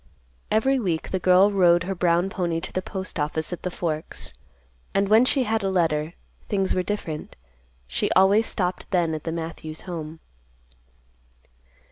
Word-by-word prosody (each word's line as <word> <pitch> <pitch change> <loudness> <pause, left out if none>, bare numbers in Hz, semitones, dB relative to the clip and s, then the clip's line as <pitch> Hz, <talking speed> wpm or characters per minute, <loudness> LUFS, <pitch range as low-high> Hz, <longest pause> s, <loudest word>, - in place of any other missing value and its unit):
Every 260 +6 +2
week 175 -8 -2
the 190 - 0
girl 185 +3 +5
rode 175 -3 +4
her 195 +1 -2
brown 175 +1 +1
pony 170 -4 -1
to - - -4
the 185 - -1
Postoffice 160 -4 -3
at 175 - -6
the 180 - -2
Forks; 160 -3 -3 0.6
and 195 0 +3
when 220 +4 +6
she 265 0 +3
had 225 -1 0
a 195 - 0
letter, 165 -3 0 0.3
things 195 -2 0
were 185 - +1
different. 180 -6 -4 0.5
She - - -1
always 195 +4 +5
stopped 180 -2 -2
then 175 -4 +1
at 155 - -5
the 165 - -2
Matthews 160 -1 -6
home. 160 -3 -6
180 Hz, 155 wpm, -24 LUFS, 165-195 Hz, 0.6 s, when